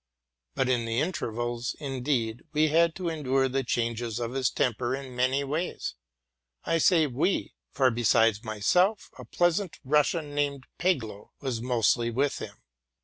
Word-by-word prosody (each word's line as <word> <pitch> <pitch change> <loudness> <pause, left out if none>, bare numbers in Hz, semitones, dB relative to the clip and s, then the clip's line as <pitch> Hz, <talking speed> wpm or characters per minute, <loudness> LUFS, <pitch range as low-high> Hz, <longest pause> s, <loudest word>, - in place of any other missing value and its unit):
But 130 - +1
in 125 -2 +1
the 115 +1 -1
intervals, 120 -7 -2
indeed, 125 -5 -2
we 155 +1 +3
had 165 +1 +3
to 185 -1 -4
endure 135 -5 +1
the 135 +1 -1
change 115 -1 -1
of 120 0 -3
his 130 -2 +1
temper 120 +1 0
in 135 -2 -8
many 130 +3 +1
ways, 155 +6 -3 0.7
I 165 - +1
say 165 -1 +4
we; 145 +8 -1 0.2
for, 130 -2 +2
besides 115 -2 +3
myself, 180 - +1
a - - -8
pleasant 175 +1 0
Russian 150 +2 +1
named 140 -2 -1 0.2
Peglow 120 - -1
was 130 -5 -3
mostly 120 -1 +2
with 135 +4 0
him. - - -9
130 Hz, 145 wpm, -27 LUFS, 120-150 Hz, 0.7 s, say